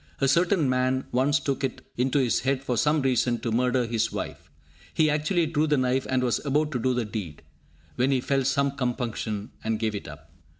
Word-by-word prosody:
A 135 - +2
certain 170 +1 +3
man 130 +1 +1
once 135 +3 +2
took 140 0 -2
it 130 - -3
into 130 +3 +1
his 130 -4 +2
head, 135 +1 -1
for 125 -3 -1
some 150 +4 +2
reason, 125 -2 +2
to 115 - -2
murder 125 +2 +2
his 115 -1 0
wife. - - -6 0.5
He 155 -1 +3
actually 155 +4 +1
drew 155 0 0
the 150 -1 +2
knife 130 0 +1
and 130 -1 +1
was 120 -2 0
about 150 +1 +1
to 125 - -1
do 125 +2 +1
the 120 -2 0
deed, 100 -8 -6 0.5
when 130 +2 +2
he 135 -2 +2
felt 135 +1 0
some 140 +1 +2
compunction, 120 -5 -3
and 110 0 0
gave 110 0 -1
it 100 - -6
up. - - -12
130 Hz, 210 wpm, -26 LUFS, 120-140 Hz, 0.5 s, certain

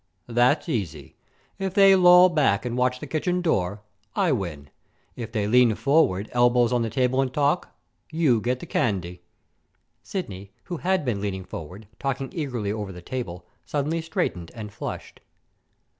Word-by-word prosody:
"That's 120 +7 +2
easy. 85 - -4 0.4
If 190 -1 -3
they 195 -1 +7
loll 180 0 +7
back 135 - +2
and 120 -1 -2
watch 125 0 +1
the - - -6
kitchen 170 +5 -1
door, 100 - -1 0.3
I 190 -5 +2
win. 85 - -4 0.4
If 115 -2 -6
they 105 -3 -1
lean 120 0 +4
forward, 135 - +2
elbows 120 0 +3
on 120 - +2
the 115 - -1
table, 130 +2 +1
and 130 -2 -1
talk, 145 +5 +1 0.4
you 150 -9 +2
get 125 +2 -1
the - - -6
candy." 90 -5 -1 0.8
Sidney, 100 - -6
who 175 - -5
had 185 -1 0
been 110 -6 -1
leaning 95 -2 -3
forward, 90 +7 -9
talking 135 -1 -3
eagerly 125 - -3
over 105 -2 -4
the 90 -1 -11
table, 90 -9 -5 0.2
suddenly 150 +3 -2
straightened 160 - -3
and 105 -3 -8
flushed. - - -7
125 Hz, 160 wpm, -25 LUFS, 100-155 Hz, 0.8 s, they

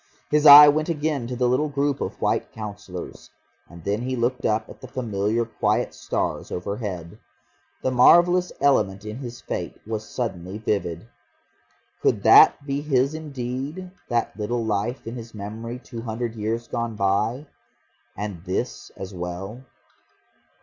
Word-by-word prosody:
His 150 0 +4
eye 145 +1 +12
went 155 +3 +2
again 150 -6 -1
to 125 - -4
the 125 0 +1
little 130 +5 +1
group 140 0 -1
of - - -4
White - - 0
Councillors. 105 -4 -8 0.4
And 85 -1 -13
then 100 +4 -1
he 130 +1 -2
looked 125 +1 -1
up 110 0 0
at - - -13
the 130 - -8
familiar 115 -3 -1
quiet 115 - 0
stars - - -3
overhead. 100 -1 -5 0.6
The 130 - +1
marvellous 175 +8 +5
element 105 -8 +2
in 105 +1 -6
his 120 -3 -8
fate - - -5
was 110 0 -5
suddenly 95 -6 -4
vivid. 100 -4 -2 0.9
Could - - +1
that 140 - +7
be 140 0 -2
his 140 -1 +1
indeed, 145 +4 -5 0.2
that 120 -1 0
little 115 +2 -2
life 110 +4 -2
in 115 - -5
his 115 -2 -9
memory 110 +4 -6
two 120 -2 -9
hundred 115 0 -4
years 115 +1 -3
gone 115 -2 -3
by 105 +7 0 0.7
and 100 -4 -5
this 90 -4 -3
as 95 +1 -7
well? 90 +7 -6
115 Hz, 150 wpm, -24 LUFS, 105-130 Hz, 0.9 s, eye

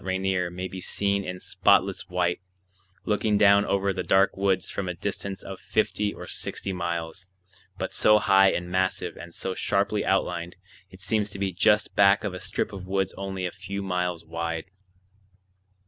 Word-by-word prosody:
Rainier 95 -1 0
may 90 +1 -5
be 95 0 -8
seen 100 +2 0
in 90 -1 -5
spotless 95 0 +2
white, 90 -1 0 0.6
looking 105 0 +1
down 100 0 +6
over 100 0 +1
the 95 - -3
dark 95 +2 +3
woods 95 -1 +1
from 95 -2 -3
a 90 - -3
distance 100 +1 -4
of 95 -1 -8
fifty 105 -1 0
or - - -9
sixty 95 - -3
miles, 85 +1 -4 0.5
but - - -4
so 105 0 +5
high 95 -2 +5
and 90 0 -3
massive 95 0 0
and 85 - -10
so 95 - -3
sharply - - 0
outlined, 85 +2 -1 0.3
it 95 -1 -15
seems 105 +1 0
to 100 - -6
be 95 -1 -1
just 105 +4 +3
back 100 0 +5
of 100 -3 -2
a 90 - -6
strip 95 +2 -3
of 95 -1 -8
woods 95 0 0
only 95 -1 -4
a 90 - -2
few 100 +3 -6
miles 90 -2 -2
wide. 85 +2 -4
95 Hz, 175 wpm, -26 LUFS, 90-100 Hz, 0.6 s, down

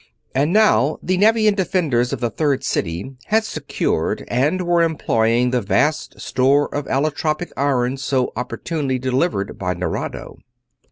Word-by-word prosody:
And 145 +5 +1
now 155 - +3
the 185 - +1
Nevian 215 +2 +4
defenders 160 - 0
of - - -3
the 120 -1 0
Third 140 -4 0
City 100 +4 -3
had 220 +1 +3
secured 220 - -2
and 150 +10 +1
were 175 0 +3
employing 125 -7 +1
the 125 -1 +1
vast 110 +10 0
store 140 +3 +1
of 145 -1 -3
allotropic 155 +4 -1
iron 135 -2 0
so 135 -1 0
opportunely 130 +3 -3
delivered 130 - -1
by 90 -1 -2
Nerado. 85 -1 -5
135 Hz, 135 wpm, -20 LUFS, 125-165 Hz, -, Nevian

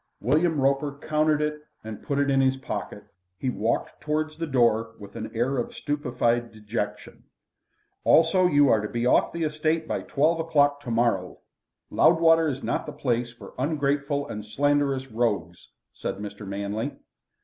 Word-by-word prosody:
William 155 - +2
Roper 140 +1 +1
counted 155 0 +1
it, 150 0 -3 0.2
and 110 -1 -7
put 140 - -2
it 140 0 +2
in 135 0 +3
his 130 0 +2
pocket. 130 - -6 0.3
He 130 +6 -1
walked 115 -1 -2
towards 155 +1 -1
the 165 +1 -4
door 115 -4 +2
with 100 -1 -12
an - - -5
air 125 +3 0
of 120 - -4
stupefied 120 -5 -1
dejection. 105 -1 -5 0.8
"Also, 180 +3 +5
you 145 -3 +4
are 110 -4 +4
to 105 - -3
be 120 0 -2
off 125 - +3
the 170 -1 -3
estate 155 +1 0
by - - -2
twelve 160 +4 +1
o'clock 145 -3 +2
tomorrow. 115 -7 0 0.5
Loudwater 165 -1 +5
is 135 -2 -3
not - - -2
the - - -4
place 120 -4 -1
for 120 - -13
ungrateful 145 0 0
and 105 -5 -6
slanderous 140 +3 +1
rogues," 105 -8 -2 0.3
said - - -4
Mr. 105 0 -8
Manley. 100 +2 -3
135 Hz, 160 wpm, -26 LUFS, 115-150 Hz, 0.8 s, Also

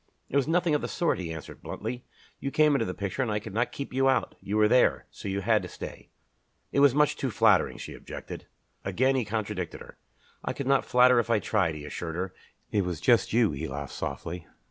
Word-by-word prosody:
"It - - -5
was 140 -1 +3
nothing 170 0 +2
of 150 - +2
the - - -2
sort," 170 - 0
he 85 -3 -4
answered 80 -2 -8
bluntly. 125 0 -5 0.4
"You 140 - -2
came 150 +1 +4
into 140 - +2
the 90 - -4
picture 100 +2 -3
and 125 - 0
I 105 - +1
could 105 -1 -6
not 120 +3 0
keep 140 - -6
you 135 +1 +3
out. 130 - +1
You 105 +2 -2
were 105 0 +5
there, 105 - +3
so - - -8
you 100 0 -1
had 110 +1 +3
to - - -6
stay." - - -9 0.6
"It - - +1
was 140 -2 +6
much 150 0 +3
too - - -2
flattering," - - +3
she - - -7
objected. - - -8 0.4
Again 130 +8 +2
he 130 - +1
contradicted 105 -4 -3
her. - - -13 0.4
"I - - -2
could 140 - -5
not 135 +1 +3
flatter 125 0 +5
if 115 - -1
I 115 - +4
tried," 95 -6 +1
he 75 -1 -8
assured 80 +1 -5
her. 90 +1 -3 0.4
"It 105 -2 +2
was 90 -3 -3
just 120 -3 +3
you." 110 -9 +3
She 80 +4 -4
laughed 70 0 -6
softly. 85 0 -5
110 Hz, 235 wpm, -28 LUFS, 90-130 Hz, 0.6 s, was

